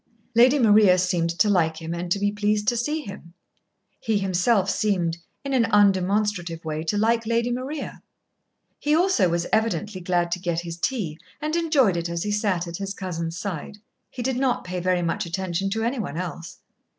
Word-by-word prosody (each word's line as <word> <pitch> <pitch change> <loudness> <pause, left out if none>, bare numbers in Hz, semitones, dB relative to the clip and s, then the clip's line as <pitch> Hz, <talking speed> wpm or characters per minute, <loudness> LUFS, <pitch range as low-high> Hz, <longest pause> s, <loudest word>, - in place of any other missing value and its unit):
Lady 250 +5 +6
Maria 210 -6 +6
seemed 180 -2 +1
to 170 +6 +2
like 165 -5 +2
him 165 0 -5
and 175 0 -5
to 200 - +3
be 205 0 0
pleased 210 0 0
to 240 - +3
see 300 +7 -1
him. 190 - -10 0.6
He 225 -3 0
himself 195 +2 +2
seemed, 180 -6 0 0.3
in 275 - -2
an 245 -3 +3
undemonstrative 195 -4 +1
way, 155 0 -3
to 205 - 0
like 225 +1 +1
Lady 235 +1 +1
Maria. 260 +5 -5 0.8
He 295 +1 +2
also 335 - +3
was 170 0 0
evidently 215 -3 0
glad 175 -1 0
to 180 - -1
get 170 -2 -1
his 170 -1 -7
tea, 175 -10 -2 0.2
and 305 +2 -2
enjoyed 290 - +3
it 170 0 -2
as 170 0 -2
he 210 - -2
sat 200 -4 0
at 170 0 -5
his 195 0 -4
cousin's 170 -3 -4
side. 190 +1 -5 0.3
He 250 - -6
did 260 0 -1
not 260 -2 0
pay 180 0 -4
very 180 0 +1
much 170 +3 -1
attention 190 +1 -2
to 225 +3 -2
any 240 +3 -1
one 170 -7 -4
else. 175 0 -6
195 Hz, 190 wpm, -24 LUFS, 175-225 Hz, 0.8 s, Lady